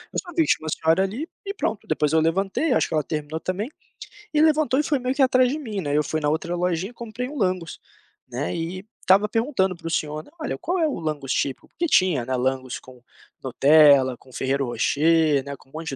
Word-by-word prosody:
só - - -3
vi 345 - -17
que 325 -2 +3
tinha - - -17
uma - - -2
senhora 160 +4 +2
ali, 230 - -4 0.2
e 400 - -3
pronto. 220 - -3
Depois 150 -1 0
eu 160 - +5
levantei, 195 - +1
acho - - +2
que - - -3
ela 155 - +1
terminou 155 +1 -4
também, 200 - -3 0.6
e 300 - +3
levantou 305 -4 +3
e - - +2
foi 295 -1 +1
meio 255 0 -1
que 280 - -1
atrás 255 -1 +4
de 300 - -3
mim, 215 -9 -4
né. 145 -3 0
Eu 150 - +3
fui 155 +2 -2
na 150 - +1
outra 170 +3 -1
lojinha, 180 +4 -1
comprei 235 +1 -6
um 295 +3 -8
langos, 185 -6 -1 0.5
né. 125 +7 -3
E 175 +3 -5 0.2
estava 195 +3 +4
perguntando 225 -4 0
para 170 -1 -9
o - - -2
senhor: 155 -1 -2 0.2
"Olha, 310 - -3
qual 360 +3 -2
é 320 - +3
o 290 - -3
langos 150 -5 -3
tipico?" 135 -2 -2
Porque 340 - -3
tinha, 185 - +3
né, 130 +1 -1
langos 130 0 -2
com 125 -1 -16 0.4
nutella, 140 -1 +5
com 130 - -20
ferrero 135 +2 -1
rocher, 150 +4 +2
né, 140 0 -6
com - - -23
um - - -28
monte 160 +1 -5
170 Hz, 230 wpm, -23 LUFS, 150-245 Hz, 0.6 s, eu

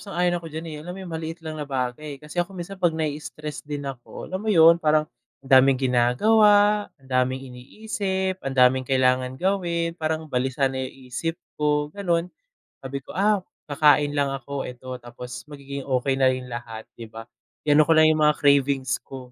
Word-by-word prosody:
sang-ayon 175 -3 0
ako 165 - -10
diyan, 160 +1 -6
eh, - - -6
alam 175 +4 -7
mo - - -9
yung, 175 - -8
maliit 165 +1 -6
lang 155 -1 -5
na 145 - -5
bagay. 135 +2 -3
Kasi 150 +5 -4
ako 185 +2 -4
minsan, 190 +2 -7
'pag 170 -3 +2
na-i-stress 150 -1 -4
din 145 -1 -6
ako, 135 -3 -7
alam 185 +1 -3
mo 220 - -4
'yon, 170 -3 +6
parang, 155 -1 +3 0.4
ang 135 - -15
daming 135 0 +4
ginagawa, 205 - +4
ang 135 -3 -22
daming 130 +1 +1
iniisip, 190 - -3
ang 135 -1 -4
daming 130 0 +4
kailangan 130 -1 +2
gawin, 170 -1 0
parang 155 0 -2
balisa 130 +1 0
na 130 - -4
yung 130 0 -8
isip 165 +7 -2 0.2
ko, 150 0 +1
gano'n. 175 -2 -1 0.5
Sabi 135 +1 -5
ko, - - -10
ah, 205 +2 +3 0.3
kakain 145 0 +4
lang 140 -1 +1
ako, 135 +1 -5
eto, 125 +1 -7
tapos 120 0 -9
magiging 140 -2 -8
okey 135 0 0
na 135 -1 +4
rin 130 -1 -3
lahat, 115 -2 -6
'di 115 - -8
ba, 115 +1 -9 0.4
i-ano 150 0 +4
ko 165 - +5
lang 155 0 +6
yung 155 - 0
mga 150 - +3
cravings 140 -3 +2
ko, 130 -2 -10
145 Hz, 190 wpm, -24 LUFS, 130-170 Hz, 0.5 s, yon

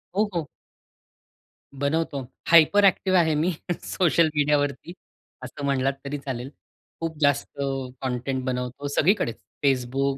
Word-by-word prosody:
हो, 210 +1 +2
हो. 165 -4 -2 1.3
बनवतो. 145 0 -1 0.3
हायपर 170 +5 +7
एक्टिव्ह 190 -1 +3
आहे 160 -2 +3
मी 165 +5 +1 0.3
सोशल 170 -2 +2
मीडियावरती, 145 +1 0 0.5
असं 135 +2 -6
म्हणलात 135 -1 +1
तरी 145 +1 -3
चालेल. 130 -2 -5 0.5
खूप 165 -2 -3
जास्त 145 0 +1 0.4
कंटेंट 130 0 -2
बनवतो, 125 +2 -3
सगळीकडेच 155 - +1 0.3
Facebook, 135 +1 +1
145 Hz, 110 wpm, -25 LUFS, 135-165 Hz, 1.3 s, हायपर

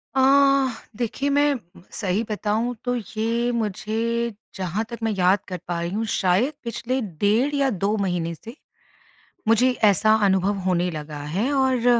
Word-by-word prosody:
अ, - - +3 0.8
देखिए 250 +4 -1
मैं 290 +1 +3 0.4
सही 200 +1 -1
बताऊँ, 215 +3 -1
तो 245 0 0 0.2
ये 235 +2 0
मुझे 230 +1 -1 0.2
जहाँ 190 +3 -2
तक 235 - -6
मैं 225 - +1
याद 185 +2 +4
कर 180 -2 -5
पा 175 -1 -2
रही 170 - -2
हूँ, 220 +3 -1
शायद 205 +8 +1
पिछले 240 +3 -2
डेढ़ 210 - +1
या 275 -1 +2
2 205 0 0
महीने 175 -4 -1
से 230 - -11 0.9
मुझे 245 +3 +5
ऐसा 215 +2 +5
अनुभव 190 +1 +2
होने 180 -1 +1
लगा 150 -1 -6 0.2
है 225 +8 +1
और 260 -3 +2
220 Hz, 150 wpm, -23 LUFS, 190-240 Hz, 0.9 s, मुझे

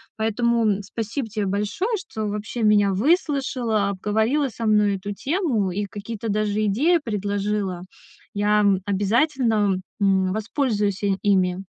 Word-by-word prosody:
Поэтому, 230 +1 +1
м, 205 - -6
спасибо 225 +5 -4
те 215 -1 -3
большое, 210 - -1
что 220 - -5
вообще 210 +3 -4
меня 205 -2 +4
выслушала, 255 - +1
обговорила 220 +8 0
со 230 0 -6
мной 210 -2 +3
эту 205 +2 -5
тему 265 - 0
и 205 +3 -2
какие-то 215 +2 -6
даже 215 0 0
идеи 300 - +3
предложила. 205 -3 -2 0.5
Я, 210 +1 +2
м, 195 -2 +3
обязательно, 210 0 +1 0.2
м, 190 -2 +2
воспользуюсь, 210 -2 -1
э, 200 -1 +2
ими. 185 -3 +2
210 Hz, 135 wpm, -23 LUFS, 200-235 Hz, 0.5 s, меня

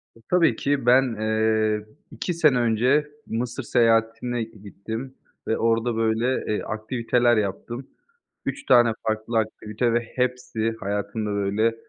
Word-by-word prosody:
E, - - -18
tabii 165 -9 +4
ki 140 +1 -1
ben, 125 -1 +4
eee, 110 -1 +1 0.3
2 180 - -3
sene 155 -6 +4
önce 125 +6 +2 0.2
Mısır 120 +2 -3
seyahatine 115 +1 +2
gittim 110 +4 -8 0.3
ve 110 - +1
orada, 115 +1 +1
böyle, 115 +1 0
eee, - - -1
aktiviteler 120 +2 +1
yaptım. 115 +5 -3 0.6
3 285 +1 -4
tane 120 -2 +6 0.2
farklı 110 +1 -1
aktivite 110 +2 -2
ve 120 - +3 0.2
hepsi 125 -3 -1
hayatımda, 105 +1 -3
böyle, 100 +3 +1
115 Hz, 125 wpm, -24 LUFS, 110-125 Hz, 0.6 s, tane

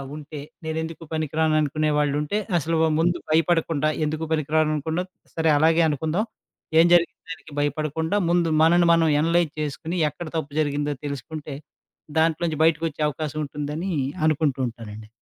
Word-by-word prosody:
ఉంటే, 150 0 -8 0.3
నేనెందుకు 160 +1 -4
పనికిరాను 155 0 0
అనుకునే 155 +1 0
వాళ్ళుంటే, 150 +5 0 0.2
అసలు 165 +1 0 0.2
ముందు 175 +2 +2
భయపడకుండా 160 -2 +2 0.2
ఎందుకు 155 +1 -3
పనికిరాను 155 0 +1
అనకుండా, 160 +4 -2 0.3
సరే 160 -1 +2
అలాగే 160 +2 +4
అనుకుందాం. 160 - -1 0.5
ఏం 165 - +7
జరిగింది 170 -2 +3
దానికి 165 -2 -10
భయపడకుండా, 155 +4 -1
ముందు 170 -1 +2
మనల్ని 170 +1 +5
మనం 165 -1 +3 0.2
అనలైజ్ 165 -1 +2
చేసుకొని, 160 +4 -4
ఎక్కడ 165 +3 -8
తప్పు 145 -2 -4
జరిగిందో 145 0 -1
తెలుసుకుంటే, 145 +1 -6 0.6
దాంట్లో 160 +1 +2
నుంచి 155 -1 -2
బయటికొచ్చే 160 -1 0
అవకాశం 155 0 -4
ఉంటుందని 150 +6 -4 0.3
అనుకుంటూ 150 -3 +1
ఉంటానండి. 110 -2 -9
155 Hz, 135 wpm, -24 LUFS, 150-165 Hz, 0.6 s, ఏం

